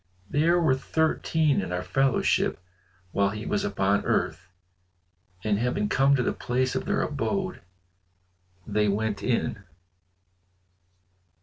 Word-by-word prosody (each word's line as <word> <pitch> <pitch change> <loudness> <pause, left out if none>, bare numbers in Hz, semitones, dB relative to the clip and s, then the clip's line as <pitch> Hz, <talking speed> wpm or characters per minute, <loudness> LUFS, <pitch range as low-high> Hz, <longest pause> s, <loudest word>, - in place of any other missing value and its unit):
There 165 - +3
were 160 -6 +3
thirteen 155 0 +1
in 95 - -5
our 90 0 -2
fellowship 135 -8 +1 0.5
while 100 0 +2
he 105 +2 -6
was 205 - 0
upon 100 - +1
earth." 85 - -1 0.9
And 105 -1 +1
having 110 -3 0
come 135 +5 +4
to 125 - +1
the - - 0
place 130 +1 -1
of - - -2
their - - +1
abode, 185 +6 -2 1.0
they 105 0 +1
went 105 0 -1
in. 115 -4 -1
125 Hz, 120 wpm, -26 LUFS, 105-150 Hz, 1.0 s, come